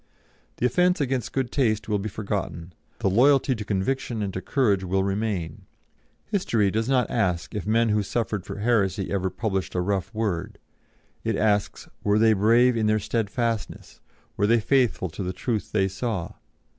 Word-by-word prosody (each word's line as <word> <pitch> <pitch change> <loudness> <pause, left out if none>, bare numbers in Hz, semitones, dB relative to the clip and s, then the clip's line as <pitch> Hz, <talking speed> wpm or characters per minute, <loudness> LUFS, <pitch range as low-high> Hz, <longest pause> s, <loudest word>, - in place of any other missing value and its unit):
The - - 0
offence 180 +8 +3
against 130 -4 -1
good 130 -2 -2
taste 110 -6 +1
will 105 -2 0
be 105 +2 -3
forgotten; 95 -5 -4 0.3
the - - +2
loyalty 135 +7 +4
to 110 -3 -5
conviction 110 +3 -2
and 95 -2 -3
to 95 - -4
courage 105 -9 +1
will 95 +1 0
remain. 100 -5 -3 0.6
History 115 - +1
does 110 +4 -1
not 125 -4 +2
ask 90 -3 0
if 105 - -4
men 115 +1 +3
who 105 0 +2
suffered 105 -1 -2
for - - -7
heresy 100 -4 +1
ever 95 -1 0
published 95 0 -3
a - - +1
rough 95 0 -1
word; 105 -6 -2 0.7
it 110 -1 0
asks, 105 -1 0 0.2
Were 105 0 +3
they 110 0 +5
brave 115 +5 +4
in 110 -2 +1
their 110 0 +3
steadfastness; 115 0 -3 0.4
were 100 - +2
they 115 +1 +4
faithful 120 - +1
to 80 - -7
the 90 -1 -3
truth 110 -3 -3
they 95 -3 +2
saw? 95 -2 -3
105 Hz, 170 wpm, -25 LUFS, 95-120 Hz, 0.7 s, they